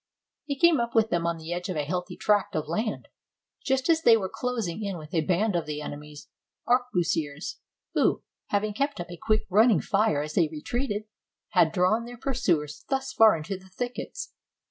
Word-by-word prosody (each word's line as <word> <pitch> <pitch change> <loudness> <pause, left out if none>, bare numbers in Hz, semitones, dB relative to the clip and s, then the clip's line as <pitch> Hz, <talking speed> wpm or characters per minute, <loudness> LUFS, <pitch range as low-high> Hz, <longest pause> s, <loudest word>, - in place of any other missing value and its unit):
He 280 -2 -3
came 340 -2 +5
up 235 0 -2
with 225 -1 +3
them 170 -1 +1
on 170 0 -1
the 160 +1 -5
edge 180 +2 -4
of 185 - -2
a 150 - 0
heathy 180 +3 -3
tract 205 -4 +1
of 155 -1 -1
land, 215 +7 -2 0.6
just 265 -1 +1
as 325 -1 +4
they 230 -7 +7
were 190 -3 -3
closing 220 -6 -2
in 200 -3 -3
with 155 -1 -11
a 165 - +3
band 185 +5 +1
of 170 -3 -1
the 150 -1 -3
ene 150 -1 -5
my's 150 0 -12 0.4
arquebusiers, 175 - 0 0.4
who, - - +2 0.2
having 205 +1 0
kept 280 +3 -1
up 175 0 -6
a 175 - -7
quick 215 +5 +1
running 215 -1 +5
fire 195 -8 +1
as 155 0 -6
they 165 -1 +3
retreated, 210 - -2 0.5
had 175 -5 +4
drawn 185 +7 +2
their 245 0 -9
pursuers 185 - -1
thus 265 -1 -1
far 220 -5 +6
into 175 +5 -5
the 190 0 -18
thickets. 245 - -5
195 Hz, 195 wpm, -27 LUFS, 165-235 Hz, 0.6 s, they